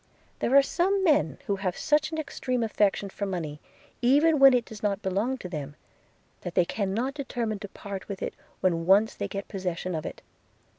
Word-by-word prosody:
There - - 0
were 275 +2 +7
some 380 +6 +1
men 220 - +3
who 200 - 0
have 190 -2 -2
such 305 +1 +2
an 320 - -3
extreme 255 -5 -2
affection 205 -2 +1
for 200 - -3
money, 160 -6 -4 0.4
even 290 +5 +4
when 270 0 +9
it 240 -2 +1
does 215 -2 -10
not 205 -1 -1
belong 205 +7 0
to 190 - -7
them, 150 -4 -6 0.6
that 175 - -7
they 180 - +4
cannot 220 +8 -1
determine 240 -7 -3
to 205 - -6
part 195 -1 -7
with 200 -2 -5
it - - -3 0.3
when 170 -2 +1
once 205 +4 +5
they - - -4
get 200 -1 -5
possession 185 -2 -3
of 155 -2 -3
it. - - -9
205 Hz, 195 wpm, -27 LUFS, 185-265 Hz, 0.6 s, when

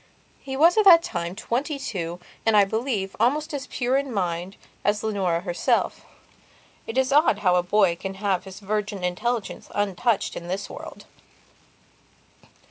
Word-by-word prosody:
He 265 -1 -6
was 335 +6 +5
at 425 - +3
that 335 -3 +9
time 170 - -4
twenty 265 +8 -2
two 175 -10 -4 0.2
and, 225 -2 +4
I 200 - +7
believe, 220 -2 -2
almost 295 +7 +1
as 280 -2 -4
pure 255 0 0
in 275 -1 -2
mind 180 -2 -2 0.3
as 210 +1 +1
Leonora 190 -6 0
herself. 175 -2 0 0.8
It 225 - -4
is 265 +1 +2
odd 295 -7 +4
how 180 - +5
a 180 - +4
boy 180 -1 +2
can 195 +2 -6
have 195 -2 -1
his 190 +1 -10
virgin 205 -1 -3
intelligence 220 +5 -2
untouched 205 +2 0
in 170 - -7
this 190 +3 -4
world. - - -10
205 Hz, 155 wpm, -24 LUFS, 185-255 Hz, 0.8 s, that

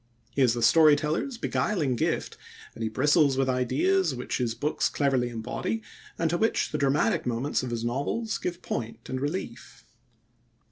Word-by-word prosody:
He 140 - -1
has 120 -3 +4
the 120 - -2
story 155 -2 +7
teller's 160 - -2
beguiling 160 - 0
gift, - - -1 0.4
and 115 - -11
he 110 - 0
bristles 140 +3 +3
with 135 -1 +2
ideas 135 +7 +1
which 125 - -3
his 115 -2 -1
books 150 +4 0
cleverly 135 -4 +1
embody 120 - -3 0.3
and 165 - +1
to 175 - 0
which 225 - +1
the 150 - -2
dramatic 140 -2 +1
moments 125 +4 0
of 130 - -4
his 120 -1 -3
novels 145 - -2
give 175 0 -4
point 115 0 -5
and 130 0 -3
relief. 145 -5 -5
135 Hz, 170 wpm, -27 LUFS, 120-160 Hz, 0.4 s, story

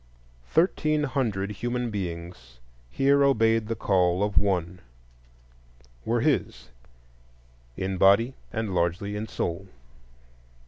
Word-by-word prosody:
Thirteen 155 -3 +2
hundred 115 -8 -1
human 120 +2 -3
beings 85 - -6 0.3
here 140 - +3
obeyed 115 -5 +3
the 115 - -2
call 90 -2 +1
of 105 -1 +2
one,—were 95 -2 -2 1.4
his - - -1 1.1
in 95 0 -2
body, 100 +7 +4 0.2
and 110 -4 -3
largely 90 +4 -1
in 105 +2 -4
soul. 85 0 -4
100 Hz, 95 wpm, -26 LUFS, 90-120 Hz, 1.4 s, body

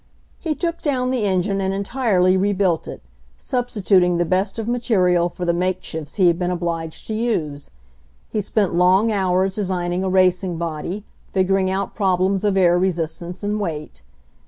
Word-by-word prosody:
He 320 -3 -2
took 335 0 -3
down 255 -4 0
the 245 -5 0
engine 195 +1 0
and 190 0 -1
entirely 200 -3 +2
rebuilt 190 -3 +1
it, - - -8 0.3
substituting 195 -8 +1
the 175 - +1
best 190 +4 0
of 225 -1 -3
material 185 -8 +2
for 175 +1 -6
the 170 - +2
make 185 +1 -1
shifts 155 -2 -6
he 190 - +3
had 170 0 +3
been 180 -1 0
obliged 170 -2 -3
to 220 - -4
use. 170 -11 -2 0.6
He 215 - 0
spent 200 -1 0
long 185 +5 +4
hours 190 -1 +1
designing 180 -2 -1
a 190 - 0
racing 185 -1 +2
body, 170 +4 -4 0.3
figuring 190 0 +1
out 190 0 -2
prob 190 -4 +1
lems 190 +1 +1
of 205 -2 +1
air 175 -2 +4
resistance 175 0 -2
and 210 +1 -1
weight. 155 - -5
185 Hz, 170 wpm, -21 LUFS, 175-205 Hz, 0.6 s, long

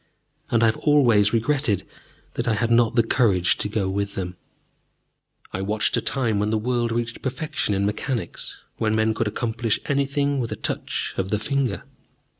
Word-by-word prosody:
And 115 -1 +3
I - - +7
have 110 - +2
always 120 -9 +4
regretted 115 -4 +1 0.5
that - - -3
I 110 - +2
had 115 +2 0
not 115 0 +4
the 115 - +5
courage 100 -7 +2
to 105 - -1
go 105 -3 -1
with 100 +1 -2
them. 90 -1 -4 1.2
I 95 - -2
watched 105 +2 +1
a - - +1
time 115 -6 0
when 105 +1 +1
the 110 - +1
world 120 +1 0
reached 120 0 -2
perfection 130 -5 -2
in 100 +1 +1
mechanics, 105 -1 -3 0.2
when 110 -1 +1
men 110 0 +2
could 110 +1 -1
accomplish 115 +1 -1
anything 140 0 +1
with 115 -2 -2
a - - -1
touch - - -3
of 95 0 -1
the 105 - +1
finger. 130 -1 -1
115 Hz, 180 wpm, -24 LUFS, 105-125 Hz, 1.2 s, I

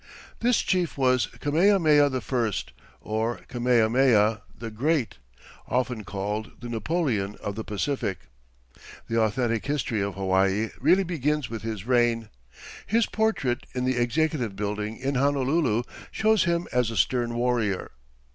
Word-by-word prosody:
This 245 0 +3
chief 180 -5 0
was 130 -3 +3
Kamehameha 155 -2 +3
I, 125 -3 -1 0.5
or 110 +2 -2
Kamehameha 115 -2 +3 0.2
the 115 0 -6
Great, 125 - 0 0.5
often 125 -2 -1
called 105 +2 -4
the 120 - -7
Napoleon 115 - -1
of 100 - -5
the 110 +2 -5
Pacific. 105 -1 -2 0.9
The 115 0 0
authentic 115 +1 0
history 130 -7 -1
of 100 -1 -2
Hawaii 95 +2 +1
really 175 +9 +4
begins 150 -5 -1
with 115 -2 -5
his 110 -3 -5
reign. 120 -3 +2 0.6
His 225 +2 +3
portrait 215 - -1
in 125 0 -1
the 130 -1 +1
Executive 125 -3 0
Building 105 +2 -3
in 135 +2 -2
Honolulu 135 -2 +1 0.3
shows 220 0 +2
him 170 0 0
as 125 -1 +1
a 115 - -5
stern 120 +5 +1
warrior. 120 -5 0
120 Hz, 130 wpm, -26 LUFS, 110-145 Hz, 0.9 s, really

